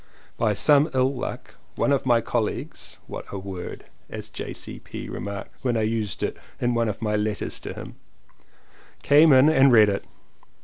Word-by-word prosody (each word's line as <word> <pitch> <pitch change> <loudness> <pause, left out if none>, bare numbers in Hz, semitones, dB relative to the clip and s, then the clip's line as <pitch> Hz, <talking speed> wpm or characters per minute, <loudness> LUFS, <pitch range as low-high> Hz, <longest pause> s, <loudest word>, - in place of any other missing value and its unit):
By 110 -2 +1
some 145 +6 +5
ill 130 +1 +2
luck 125 - -6 0.2
one - - +1
of 135 -2 +1
my 120 -2 +4
colleagues 115 -1 -3
(what - - -7
a 100 - -4
word! 95 -2 -7 0.3
as - - -8
J.C.P. - - -7
remarked 100 -1 -6
when 120 -3 0
I 110 - +1
used 110 -2 -2
it - - -2 0.2
in 120 0 +1
one 115 -1 +1
of 105 +2 -5
my 105 -1 0
letters 105 0 -2
to - - -6
him) - - -9 1.1
came 150 +2 +6
in 130 +2 +7
and 140 -4 +5
read 110 -3 +7
it. 100 - -2
115 Hz, 170 wpm, -24 LUFS, 105-130 Hz, 1.1 s, in